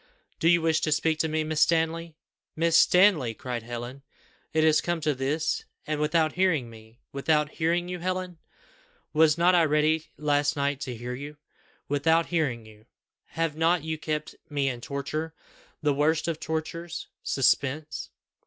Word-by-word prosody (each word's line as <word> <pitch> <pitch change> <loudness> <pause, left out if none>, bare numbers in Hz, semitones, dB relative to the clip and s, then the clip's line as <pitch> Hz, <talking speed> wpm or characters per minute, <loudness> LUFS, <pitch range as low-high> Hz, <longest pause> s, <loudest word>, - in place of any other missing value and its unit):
"Do 165 - +2
you 170 -1 +4
wish 160 -1 +2
to 155 - 0
speak 155 +1 +1
to 160 - +1
me, 155 0 -1
Miss 155 0 -1
Stanley!" 165 0 +1 0.4
"Miss 165 0 +2
Stanley!" 180 - +5
cried 125 0 -4
Helen; 120 +3 -7 0.5
"is 155 -1 +4
it - - -2
come 175 -1 -1
to 150 -1 +1
this, 140 +4 -1 0.2
and 155 -1 -2
without 155 +1 +2
hearing 165 -10 +1
me!" 110 +1 -15
"Without 150 +2 +1
hearing 170 +2 0
you, 180 0 -5
Helen! 185 -1 -3 0.7
Was 155 0 +4
not 175 +2 +4
I 175 -2 +5
ready 155 +1 +2
last 145 -1 +1
night 140 -1 -1
to 125 -2 -4
hear 120 +2 -6
you? 145 +3 -8 0.5
Without 160 +4 +2
hearing 140 -10 -1
you! 110 +1 -17 0.4
Have 165 -2 -2
not 165 0 +2
you 160 0 -2
kept 155 -1 -3 0.2
me 140 -2 0
in 120 -2 -5
torture, 155 +4 -4 0.5
the 145 -1 +3
worst 155 +4 +1
of 165 -2 -2
tortures 160 +1 -4 0.2
suspense? 140 +3 0
155 Hz, 165 wpm, -27 LUFS, 140-165 Hz, 0.7 s, Stanley